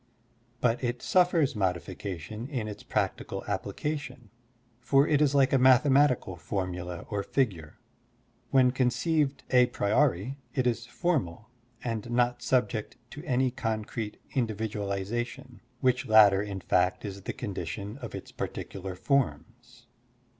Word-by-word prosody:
But 120 +1 +1
it 120 0 -2
suffers 175 -7 +3
modification 95 +2 -3
in 125 -7 -3
its 105 - -7
practical - - -2
application, 145 -6 -4 0.5
for 135 +3 +3
it 150 -1 +3
is 145 -1 +3
like 135 -1 +4
a 135 - +5
mathematical 130 -5 +4
formula 90 0 -4
or 100 -1 0
figure. 95 - -1 0.7
When 130 -2 +5
conceived 135 +3 +1
a 125 -1 +6
priori, 120 +1 +1 0.2
it 130 -3 +1
is 120 -1 0
formal 120 - -2 0.3
and 115 -1 -3
not 120 0 +1
subject 125 -3 0 0.2
to 150 - -8
any 130 -2 +1
concrete 110 -2 -3 0.2
individu 110 -5 -1
alization, 120 +6 -4 0.2
which 125 -2 +2
latter 105 -3 +7
in 100 -2 -5
fact 90 +4 +1
is 100 -1 -6
the - - -4
condition 100 - -5
of 120 -6 -7
its - - -8
particular 95 -1 -5
forms. 120 +1 -2
120 Hz, 125 wpm, -28 LUFS, 100-130 Hz, 0.7 s, latter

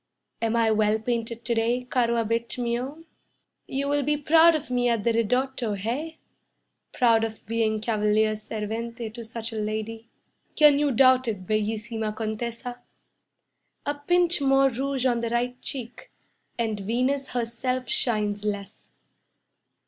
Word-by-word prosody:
Am 230 0 +1
I 225 -1 +3
well 215 0 +3
painted 230 0 -3
to 240 - +1
day, 235 +2 +1
'caro 245 -2 +1
Abate 230 +1 -1
mio'? 250 +6 -3 0.6
You 275 +1 -2
will 290 0 +2
be 295 +2 +1
proud 325 +3 +6
of 300 -4 -4
me 245 -1 +2
at 230 -3 0
the 235 - +2
'Ridotto', 245 +1 0
hey? 275 +11 -3 0.7
Proud 230 -2 +3
of 220 -1 -5
being 220 -1 0
'Cavalier 215 -1 +2
Servente' 220 +2 -5
to 235 0 -7
such 225 0 -6
a - - -4
lady?" 220 +1 -4 0.5
"Can 295 -2 +6
you 295 -1 +2
doubt 255 0 +5
it, 200 -5 -3
'Bellissima 215 +1 -2
Contessa'? 235 +3 -4 1.0
A 290 - 0
pinch 345 +3 +2
more 270 0 +4
rouge 265 +1 -2
on 240 -2 +2
the 230 0 -2
right 245 +1 -1
cheek, 255 - -7 0.5
And 220 -3 -1
Venus 255 +7 0
herself 250 +2 -2
shines 215 - 0
less..." 205 -1 -5
235 Hz, 140 wpm, -26 LUFS, 220-260 Hz, 1.0 s, proud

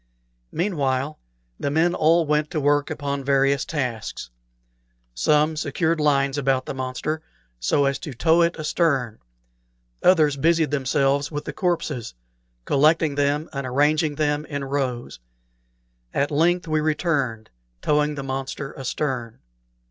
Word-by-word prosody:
Meanwhile, 145 -6 -1 0.4
the 140 - -1
men 165 +4 +2
all 165 0 +3
went 150 0 +1
to 165 - -2
work 145 0 +2
upon 140 -1 -3
various 140 0 +2
tasks. 125 - -4 0.8
Some 150 - +2
secured 160 +2 0
lines 140 -1 +2
about 135 -1 +1
the - - -4
monster 130 +4 -3 0.4
so 140 - +2
as 140 0 0
to 145 - -7
tow 165 +7 +3
it 170 0 +2
astern; 145 -7 0 0.8
others 155 -6 +4
busied 165 +1 +2
themselves 140 +1 +1
with 145 -1 -4
the 150 - -5
corpses, 150 - -2 0.5
collecting 155 +2 +3
them 145 +2 0
and 140 -2 -3
arranging 150 +4 +2
them 150 -1 0
in 140 -2 -4
rows. 135 - -3 1.0
At 140 +2 +1
length 170 +4 +2
we 155 -1 +1
returned, 145 - -1 0.3
towing 150 0 +2
the 140 - -5
monster 135 +1 -4
astern. 125 -3 -3
145 Hz, 130 wpm, -23 LUFS, 135-155 Hz, 1.0 s, others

